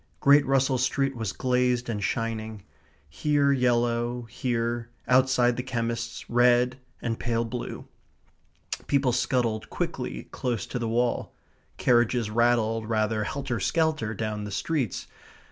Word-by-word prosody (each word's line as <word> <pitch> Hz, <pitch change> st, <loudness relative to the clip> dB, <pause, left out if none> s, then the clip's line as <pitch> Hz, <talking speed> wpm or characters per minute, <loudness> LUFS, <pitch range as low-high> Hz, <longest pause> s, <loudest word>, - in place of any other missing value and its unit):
Great 140 Hz, +1 st, +6 dB
Russell 135 Hz, -1 st, +2 dB
Street 135 Hz, +1 st, +1 dB
was 110 Hz, -4 st, -2 dB
glazed 125 Hz, +1 st, +1 dB
and 105 Hz, -3 st, -3 dB
shining 110 Hz, -1 st, -3 dB, 0.4 s
here 145 Hz, -, +2 dB
yellow, 120 Hz, -1 st, +1 dB
here, 120 Hz, 0 st, -2 dB, 0.2 s
outside 125 Hz, -1 st, +4 dB
the -, -, 0 dB
chemist's, 115 Hz, -2 st, -3 dB
red 125 Hz, +1 st, +3 dB, 0.2 s
and 115 Hz, -1 st, -2 dB
pale 115 Hz, -1 st, 0 dB
blue. 120 Hz, +1 st, -5 dB, 1.0 s
People 140 Hz, -3 st, +2 dB
scuttled 120 Hz, -3 st, 0 dB
quickly 60 Hz, 0 st, -4 dB
close 120 Hz, -4 st, -2 dB
to 125 Hz, -, -4 dB
the 115 Hz, -1 st, -2 dB
wall; 120 Hz, +1 st, 0 dB, 0.4 s
carriages 120 Hz, -2 st, +2 dB
rattled 115 Hz, -1 st, +2 dB
rather 110 Hz, -1 st, +1 dB
helter 135 Hz, -1 st, -3 dB
skelter 150 Hz, -, 0 dB
down 105 Hz, -1 st, -3 dB
the 105 Hz, -, -5 dB
streets. 130 Hz, -, -2 dB
120 Hz, 125 wpm, -27 LUFS, 115-125 Hz, 1.0 s, Great